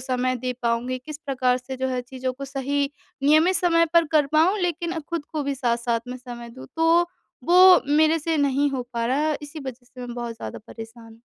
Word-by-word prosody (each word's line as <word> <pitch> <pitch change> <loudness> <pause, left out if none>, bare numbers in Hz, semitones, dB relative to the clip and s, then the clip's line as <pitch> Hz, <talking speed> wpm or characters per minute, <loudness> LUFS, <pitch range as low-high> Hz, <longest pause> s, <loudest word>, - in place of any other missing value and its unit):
समय 255 0 -1
दे 250 +1 -3
पाऊँगी? 240 +2 -1
किस 295 +3 -9
प्रकार 255 -2 +1
से 260 +1 -7
जो 260 0 -1
है 255 -1 -1
चीज़ों 255 0 -4
को 275 +2 -8
सही 280 +1 -2 0.3
नियमित 315 +5 +4
समय 335 -1 +3
पर 335 -1 +5
कर 300 -2 +4
पाऊँ? 320 +8 +3
लेकिन 345 -2 -2
खुद 320 0 -5
को 305 -2 -1
भी 280 0 -2
साथ-साथ 235 -2 0
में 250 - -5
समय 240 -2 -9
दूँ। 255 +3 -11
तो 330 +2 +4 0.4
वो 365 +1 +7
मेरे 310 +2 +4
से 320 +1 -1
नहीं 285 0 +2
हो 265 -2 -2
पा 230 -1 -1
रहा, 295 +4 +1
इसी 295 +1 -8
वजह 250 -1 -7
से 250 +1 -13
मैं 245 -1 -6
बहुत 240 -1 -5
ज़्यादा - - -7
परेशान 225 0 -11
हूँ। 225 - -20
275 Hz, 210 wpm, -24 LUFS, 250-315 Hz, 0.4 s, वो